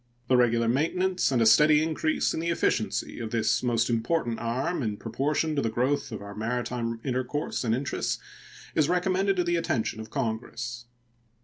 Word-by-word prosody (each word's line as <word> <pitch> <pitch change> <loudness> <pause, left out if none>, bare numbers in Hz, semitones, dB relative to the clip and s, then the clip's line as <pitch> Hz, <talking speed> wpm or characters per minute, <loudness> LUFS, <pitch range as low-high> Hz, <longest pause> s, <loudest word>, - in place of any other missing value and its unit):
The 130 - +5
regular 120 -2 +3
maintenance 180 +8 +1
and 120 -3 +3
a - - +2
steady 150 +7 +6
increase 155 0 0
in - - -2
the 170 +1 -1
efficiency 170 - 0
of 115 -2 -4
this 110 -1 +1
most 120 -2 +1
important 120 +1 0
arm 130 +8 -1
in 105 -4 -2
proportion 145 +8 -1
to 140 - +1
the 115 - 0
growth 130 +6 0
of - - -6
our 100 0 -8
maritime 115 +1 -2
intercourse 130 +3 -2
and 115 -2 +1
interests 140 +3 -2 0.6
is 155 0 +2
recommended 190 +2 +2
to 180 - +1
the 175 0 +1
attention 115 -9 -1
of 110 0 -7
Congress. 120 -1 -4
125 Hz, 175 wpm, -27 LUFS, 115-155 Hz, 0.6 s, steady